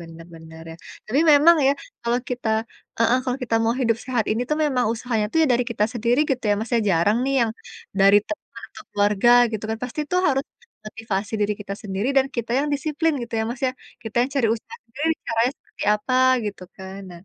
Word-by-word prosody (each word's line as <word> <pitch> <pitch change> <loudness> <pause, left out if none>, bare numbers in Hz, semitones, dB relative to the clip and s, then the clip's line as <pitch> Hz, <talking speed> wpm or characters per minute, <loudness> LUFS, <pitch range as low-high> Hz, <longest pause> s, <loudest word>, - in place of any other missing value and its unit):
bener 165 0 -11
bener, 160 0 -12
ya. - - -11 0.3
Tapi 265 +8 +1
memang 320 +4 +7
ya, 275 - +5 0.3
kalau 235 +1 +1
kita 250 -3 -3 0.5
heeh, 235 +2 +3
kalau 250 0 -1
kita 230 -2 -1
mau 230 +1 +1
hidup 230 -2 +2
sehat 245 -4 0
ini 225 - -1
tuh, 300 - 0
memang 260 -4 +1
usahanya 225 -2 -2
itu, 275 - -5
ya - - +1
dari 245 0 +2
kita 210 -2 +1
sendiri, 240 +2 0
gitu 255 -3 -1
ya, 205 - +4
Mas, 225 - -5
ya. 230 - +3
Jarang 180 +5 +3
nih, 275 0 0
yang 225 - -2 0.5
dari 195 +1 +7
teman 315 - -8
atau - - -12
keluarga, 205 +3 +3 0.2
gitu 220 -1 -4
kan. 220 - -2
Pasti 250 +4 -4
tuh 365 - +3
harus 270 0 +1 0.4
motivasi 215 -1 -4
diri 210 0 +1
kita 200 -1 -6
sendiri 200 +4 -2
dan 270 -1 +4
kita 235 0 -3
yang 295 - -2
disiplin, 310 +3 0
gitu 235 -1 -7
ya, 220 - +1
Mas, 245 - -6
ya. 255 - -1 0.3
Kita 225 -1 -8
yang 265 - -2
cari 255 -5 +2
usaha 235 - -10
sendiri, 290 +8 -2 0.2
caranya 230 +2 +1
seperti - - -12
apa, 230 +5 -3 0.3
gitu 200 -2 -6 0.2
kan. 190 +1 -8
Nah, 170 -1 -11
230 Hz, 215 wpm, -23 LUFS, 210-260 Hz, 0.5 s, memang